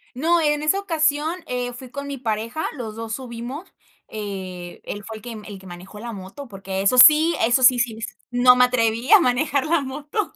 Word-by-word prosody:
No, 330 Hz, +6 st, +2 dB
en 295 Hz, -1 st, +1 dB
esa 345 Hz, +6 st, +2 dB
ocasión, 315 Hz, -4 st, 0 dB
eh, 245 Hz, 0 st, -3 dB
fui 250 Hz, +1 st, -11 dB
con 280 Hz, +1 st, -6 dB
mi 280 Hz, -1 st, -5 dB
pareja, 230 Hz, +4 st, -3 dB
los 225 Hz, -5 st, -7 dB
2 225 Hz, 0 st, -6 dB
subimos, 255 Hz, -, -7 dB, 0.4 s
eh, 190 Hz, -4 st, -7 dB
él 205 Hz, -, -7 dB
fue 220 Hz, -, -7 dB
el -, -, -14 dB
que 240 Hz, -, -8 dB
el 210 Hz, -2 st, -9 dB
que 190 Hz, -, -14 dB
manejó 180 Hz, +4 st, -11 dB
la 235 Hz, +1 st, -7 dB
moto 200 Hz, +8 st, -9 dB
porque 195 Hz, -2 st, -5 dB
eso 200 Hz, +6 st, +2 dB
sí, 310 Hz, +5 st, +7 dB
eso 240 Hz, +3 st, +2 dB
sí 250 Hz, 0 st, +6 dB
sí 235 Hz, -2 st, -1 dB, 0.4 s
no 250 Hz, +1 st, +5 dB
me 250 Hz, -, +5 dB
atreví 235 Hz, -1 st, 0 dB
a 425 Hz, -, +9 dB
manejar 280 Hz, +1 st, 0 dB
la 335 Hz, -1 st, +2 dB
moto 290 Hz, +9 st, -4 dB
245 Hz, 205 wpm, -22 LUFS, 215-290 Hz, 0.4 s, a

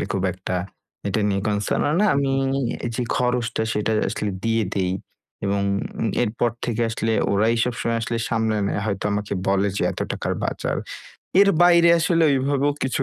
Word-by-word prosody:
আসলে -, -, -1 dB
খুব 95 Hz, -, -1 dB
একটা 95 Hz, 0 st, -5 dB, 0.5 s
এটা 100 Hz, +2 st, 0 dB
নিয়ে 100 Hz, -1 st, 0 dB
concern 105 Hz, 0 st, 0 dB
ও -, -, +1 dB
না -, -, +4 dB
আমি 140 Hz, -1 st, +1 dB, 0.6 s
যে 125 Hz, -, -1 dB
খরচটা 125 Hz, -2 st, 0 dB
সেটাই 105 Hz, 0 st, 0 dB
আসলে 105 Hz, 0 st, -2 dB
দিয়ে 115 Hz, 0 st, +2 dB
দেই 95 Hz, -2 st, 0 dB, 0.5 s
এবং 100 Hz, 0 st, 0 dB, 0.6 s
এরপর 120 Hz, +1 st, 0 dB
থেকে 120 Hz, -1 st, -1 dB
আসলে 115 Hz, 0 st, -1 dB, 0.2 s
ওরাই 110 Hz, +3 st, +3 dB
সবসময় 120 Hz, -1 st, -1 dB
আসলে 115 Hz, +1 st, -2 dB
সামলে 110 Hz, -1 st, 0 dB
নেয় 100 Hz, -, -1 dB
হয়তো 100 Hz, -2 st, -2 dB
আমাকে 105 Hz, 0 st, -2 dB
বলে 100 Hz, +1 st, +2 dB
যে, -, -, 0 dB
এত -, -, -7 dB
টাকার -, -, -2 dB
বাজার। -, -, -2 dB, 0.6 s
এর 200 Hz, -, +6 dB
বাইরে 170 Hz, -1 st, +6 dB
আসলে 165 Hz, 0 st, +2 dB
ওই 140 Hz, -, +3 dB
ভাবেও 145 Hz, 0 st, +2 dB
কিছু 135 Hz, +1 st, 0 dB
115 Hz, 170 wpm, -23 LUFS, 100-125 Hz, 0.6 s, এর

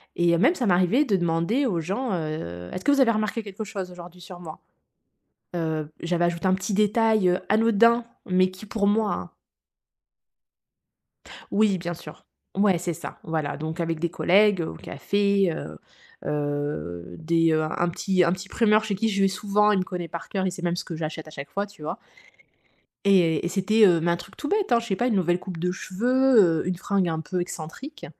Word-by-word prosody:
Et 170 Hz, -1 st, +3 dB
même, 280 Hz, -, +4 dB
ça 245 Hz, -, -1 dB
m'arrivait 185 Hz, +10 st, +3 dB
de 200 Hz, -, +1 dB
demander 175 Hz, +10 st, +1 dB
aux 180 Hz, -8 st, 0 dB
gens, 200 Hz, +10 st, -2 dB
heu: 155 Hz, -, -4 dB
«Est-ce 185 Hz, -, -5 dB
que 285 Hz, -, +3 dB
vous 280 Hz, -, +3 dB
avez 250 Hz, -3 st, +5 dB
remarqué 215 Hz, +1 st, -1 dB
quelque 200 Hz, +1 st, -7 dB
chose 190 Hz, -3 st, -6 dB
aujourd'hui 180 Hz, 0 st, -12 dB
sur 180 Hz, 0 st, -10 dB
moi?», 160 Hz, -3 st, -9 dB, 1.0 s
heu, 160 Hz, -2 st, -2 dB
j'avais 175 Hz, 0 st, +1 dB
ajouté 170 Hz, +1 st, -2 dB
un 185 Hz, -, +4 dB
petit 190 Hz, +2 st, -2 dB
détail, 215 Hz, -1 st, +3 dB
heu, 180 Hz, -, +1 dB
anodin, 230 Hz, +2 st, +4 dB, 0.2 s
mais 185 Hz, 0 st, +3 dB
qui, 190 Hz, +3 st, -11 dB
pour 200 Hz, -1 st, -1 dB
moi, 210 Hz, 0 st, +2 dB
hein -, -, -6 dB, 2.2 s
Oui, 205 Hz, -2 st, +3 dB
bien 175 Hz, 0 st, -4 dB
sûr. 150 Hz, -2 st, -12 dB, 0.3 s
Ouais, 200 Hz, -3 st, +4 dB
c'est 175 Hz, 0 st, -3 dB
ça, -, -, -8 dB
voilà, 155 Hz, -3 st, -2 dB
donc 160 Hz, +2 st, -5 dB
avec 165 Hz, -1 st, -2 dB
des 170 Hz, 0 st, -1 dB
collègues, 195 Hz, +3 st, +3 dB
au 160 Hz, -, -4 dB
café, 200 Hz, -3 st, 0 dB
heu 75 Hz, -, -7 dB, 0.5 s
heu, 145 Hz, -, -3 dB
des, 165 Hz, 0 st, +2 dB
heu, 155 Hz, 0 st, +2 dB
un 170 Hz, +2 st, -1 dB
petit 185 Hz, +1 st, +1 dB
un 170 Hz, -, +2 dB
petit 185 Hz, +1 st, -7 dB
primeur 215 Hz, -1 st, +3 dB
chez 210 Hz, -2 st, -2 dB
qui 225 Hz, +4 st, 0 dB
je 200 Hz, -1 st, 0 dB
vais -, -, +5 dB
souvent, 205 Hz, +2 st, +2 dB
il 200 Hz, -, +2 dB
me 185 Hz, -, 0 dB
connaît 180 Hz, -2 st, -5 dB
par 170 Hz, 0 st, -7 dB
cœur 190 Hz, -2 st, -1 dB
et 185 Hz, -, 0 dB
sait 180 Hz, -, -8 dB
même 175 Hz, 0 st, 0 dB
ce -, -, -4 dB
que 165 Hz, -, -6 dB
j'achète 155 Hz, 0 st, -5 dB
à -, -, -11 dB
chaque 140 Hz, -2 st, -8 dB
fois, 200 Hz, +1 st, -2 dB
tu 205 Hz, -5 st, -18 dB
vois? 150 Hz, -, -4 dB, 1.1 s
Et 175 Hz, -6 st, +3 dB
et -, -, -1 dB
c'était, 210 Hz, +3 st, +3 dB
heu, 170 Hz, -2 st, +4 dB
mais 170 Hz, +1 st, +1 dB
un 170 Hz, -, +1 dB
truc -, -, -13 dB
tout 290 Hz, -, -4 dB
bête, 405 Hz, -, 0 dB
hein, 235 Hz, -, +5 dB
je 235 Hz, -, -8 dB
sais 195 Hz, -, 0 dB
pas, 245 Hz, -, 0 dB
une 225 Hz, -, +1 dB
nouvelle 175 Hz, -1 st, +1 dB
coupe 185 Hz, -2 st, -7 dB
de 180 Hz, +2 st, -1 dB
cheveux, 215 Hz, -3 st, +3 dB
heu, -, -, -6 dB
une 180 Hz, -1 st, -1 dB
fringue 190 Hz, -2 st, 0 dB
un 160 Hz, -, -2 dB
peu 180 Hz, +3 st, -3 dB
excentrique, 175 Hz, -, -7 dB
185 Hz, 210 wpm, -25 LUFS, 165-210 Hz, 2.2 s, avez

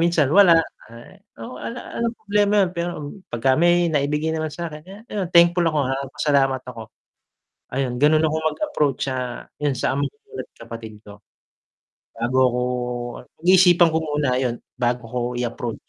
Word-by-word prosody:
minsan 170 Hz, -5 st, +3 dB
wala, 195 Hz, -3 st, +7 dB, 0.4 s
eh, 115 Hz, +1 st, -14 dB, 0.2 s
oo, 125 Hz, -, -8 dB
'ala 240 Hz, +1 st, -7 dB
'alang 235 Hz, 0 st, 0 dB
problema 205 Hz, 0 st, +1 dB
yun 175 Hz, -, -4 dB
pero, 170 Hz, +1 st, -1 dB, 0.4 s
'pagka 120 Hz, +3 st, 0 dB
may 175 Hz, +1 st, +3 dB
naibigay 150 Hz, +2 st, 0 dB
naman 155 Hz, -1 st, -3 dB
sa'kin, 160 Hz, -2 st, -6 dB
kaya 190 Hz, +3 st, -11 dB
ayun 195 Hz, -5 st, -2 dB
thankful 170 Hz, 0 st, +5 dB
ako, 155 Hz, -2 st, -1 dB
ah, 135 Hz, +1 st, -2 dB
pasalamat 135 Hz, -3 st, +1 dB
ako. 115 Hz, -3 st, -8 dB, 0.8 s
Ayun 130 Hz, -2 st, -1 dB
ganun 155 Hz, +2 st, +4 dB
akong 155 Hz, 0 st, 0 dB
mag-approach 150 Hz, -, -1 dB
sa, 125 Hz, -2 st, -4 dB, 0.2 s
yun 145 Hz, -2 st, +1 dB
sa, 130 Hz, -, -1 dB
ama 140 Hz, -, 0 dB
ko -, -, -29 dB, 0.2 s
at -, -, -8 dB
kapatid 115 Hz, -2 st, -9 dB
ko. 105 Hz, 0 st, -13 dB, 1.0 s
Bago 120 Hz, +3 st, -1 dB
ako, 125 Hz, 0 st, -2 dB, 0.8 s
pag-iisipan 175 Hz, -1 st, +6 dB
ko 160 Hz, -, +2 dB
muna 150 Hz, -3 st, -1 dB
ayun, 125 Hz, -2 st, -1 dB, 0.2 s
bago 120 Hz, 0 st, 0 dB
ko 125 Hz, +1 st, -3 dB, 0.2 s
i-approach. 120 Hz, -1 st, -4 dB
150 Hz, 160 wpm, -22 LUFS, 125-170 Hz, 1.0 s, wala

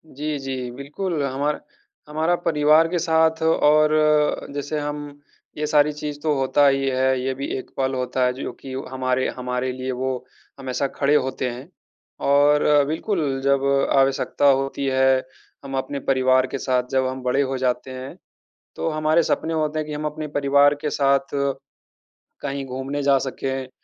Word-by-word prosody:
जी, 150 Hz, +1 st, -3 dB
जी, 130 Hz, -2 st, -4 dB
बिल्कुल, 145 Hz, +5 st, -4 dB
हमारा 140 Hz, +2 st, -1 dB, 0.5 s
हमारा 160 Hz, +3 st, +1 dB
परिवार 155 Hz, 0 st, +4 dB
के 175 Hz, +1 st, -1 dB
साथ 160 Hz, -1 st, +2 dB
और 155 Hz, -1 st, +3 dB
जैसे 145 Hz, +2 st, -3 dB
हम, 145 Hz, 0 st, -6 dB, 0.4 s
ये 150 Hz, -, -1 dB
सारी 150 Hz, -1 st, +3 dB
चीज़ 150 Hz, 0 st, -6 dB
तो 155 Hz, -1 st, +2 dB
होता 135 Hz, +2 st, +3 dB
ही 135 Hz, 0 st, +2 dB
है 130 Hz, 0 st, +1 dB
ये 130 Hz, +1 st, -1 dB
भी 140 Hz, +1 st, -4 dB
एक 130 Hz, -, -8 dB
पल 135 Hz, 0 st, 0 dB
होता 125 Hz, 0 st, 0 dB
है 125 Hz, -, +1 dB
जो 130 Hz, -, -5 dB
कि 135 Hz, -, -8 dB
ओ 135 Hz, -, -4 dB
हमारे 130 Hz, 0 st, 0 dB
हमारे 125 Hz, 0 st, -2 dB
लिए 130 Hz, +1 st, -4 dB
वो 130 Hz, 0 st, -3 dB, 0.3 s
हमेशा 135 Hz, +1 st, -2 dB
खड़े 140 Hz, +1 st, +3 dB
होते 130 Hz, -2 st, 0 dB
हैं 125 Hz, +4 st, -8 dB, 0.6 s
और 145 Hz, +1 st, +4 dB
बिल्कुल, 155 Hz, -4 st, -1 dB
जब 140 Hz, 0 st, +2 dB, 0.3 s
आवश्यकता 135 Hz, +1 st, +1 dB
होती 135 Hz, +1 st, 0 dB
है 130 Hz, 0 st, +3 dB, 0.5 s
हम 135 Hz, -1 st, -4 dB
अपने 140 Hz, +1 st, -3 dB
परिवार 130 Hz, -1 st, +3 dB
के 135 Hz, -, -4 dB
साथ 130 Hz, -1 st, 0 dB
जब 130 Hz, -1 st, +2 dB
हम 130 Hz, 0 st, -5 dB
बड़े 125 Hz, +2 st, +1 dB
हो 135 Hz, -1 st, -1 dB
जाते 125 Hz, 0 st, -1 dB
हैं, 130 Hz, +1 st, -7 dB, 0.6 s
तो -, -, -2 dB
हमारे 155 Hz, +1 st, +2 dB
सपने 165 Hz, +1 st, -1 dB
होते 155 Hz, -1 st, -1 dB
हैं 155 Hz, -, -2 dB
कि 150 Hz, -, -5 dB
हम 150 Hz, +1 st, -4 dB
अपने 150 Hz, 0 st, -4 dB
परिवार 140 Hz, +1 st, +4 dB
के 150 Hz, -, -1 dB
साथ 140 Hz, 0 st, +4 dB, 1.2 s
कहीं 140 Hz, -1 st, -4 dB
घूमने 135 Hz, +2 st, -4 dB
जा 140 Hz, -1 st, +4 dB
सकें, 130 Hz, 0 st, -4 dB
140 Hz, 170 wpm, -22 LUFS, 130-150 Hz, 1.2 s, परिवार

